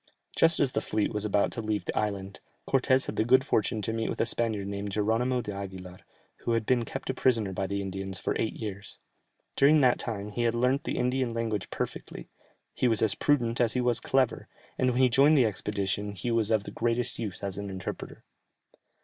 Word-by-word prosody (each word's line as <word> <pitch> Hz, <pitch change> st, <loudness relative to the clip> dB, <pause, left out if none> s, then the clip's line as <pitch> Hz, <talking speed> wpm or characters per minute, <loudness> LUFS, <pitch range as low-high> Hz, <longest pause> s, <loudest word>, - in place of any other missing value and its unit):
Just 165 Hz, 0 st, +4 dB
as 140 Hz, -3 st, +3 dB
the 110 Hz, -, -1 dB
fleet 110 Hz, +1 st, -1 dB
was 105 Hz, 0 st, -1 dB
about 105 Hz, -1 st, +2 dB
to 115 Hz, -, -3 dB
leave 105 Hz, -4 st, -2 dB
the -, -, -4 dB
island, 100 Hz, -2 st, -2 dB, 0.3 s
Cortès 130 Hz, 0 st, +3 dB
had -, -, -5 dB
the -, -, +3 dB
good 130 Hz, +3 st, +4 dB
fortune 110 Hz, -4 st, 0 dB
to 110 Hz, -, -1 dB
meet 115 Hz, 0 st, -1 dB
with -, -, -4 dB
a -, -, +3 dB
Spaniard 115 Hz, -3 st, 0 dB
named 100 Hz, 0 st, -4 dB
Jeronimo 115 Hz, +5 st, +1 dB
d'Aguilar, 95 Hz, -3 st, -7 dB, 0.4 s
who 120 Hz, -, -2 dB
had 115 Hz, -1 st, 0 dB
been 120 Hz, -1 st, +2 dB
kept -, -, -4 dB
a -, -, -6 dB
prisoner 115 Hz, -7 st, +1 dB
by 95 Hz, +1 st, -2 dB
the 100 Hz, +1 st, -2 dB
Indians 95 Hz, 0 st, -4 dB
for -, -, -2 dB
eight 110 Hz, -, 0 dB
years. 105 Hz, -2 st, -7 dB, 0.6 s
During 150 Hz, +2 st, +5 dB
that 125 Hz, -2 st, +4 dB
time 105 Hz, -3 st, -4 dB
he 120 Hz, -, -3 dB
had 120 Hz, -1 st, +1 dB
learnt 125 Hz, +4 st, +1 dB
the -, -, -2 dB
Indian 125 Hz, -1 st, 0 dB
language 110 Hz, -4 st, -2 dB
perfectly; -, -, -6 dB, 0.4 s
he 125 Hz, -, +1 dB
was 115 Hz, -2 st, +3 dB
as 105 Hz, -3 st, +3 dB
prudent 120 Hz, -4 st, +1 dB
as 115 Hz, -2 st, +2 dB
he 125 Hz, -, 0 dB
was 120 Hz, -2 st, +1 dB
clever, 130 Hz, -3 st, 0 dB, 0.3 s
and 130 Hz, -, +1 dB
when 125 Hz, +1 st, +1 dB
he -, -, +7 dB
joined 140 Hz, +5 st, +5 dB
the 130 Hz, -, +5 dB
expedition 100 Hz, -1 st, -2 dB
he 110 Hz, +5 st, -3 dB
was 115 Hz, -2 st, +2 dB
of 110 Hz, -3 st, +2 dB
the -, -, -8 dB
greatest 120 Hz, +1 st, -1 dB
use 105 Hz, -4 st, -5 dB
as 100 Hz, 0 st, -3 dB
an 100 Hz, 0 st, -5 dB
interpreter. 95 Hz, -2 st, -7 dB
110 Hz, 215 wpm, -28 LUFS, 100-125 Hz, 0.6 s, he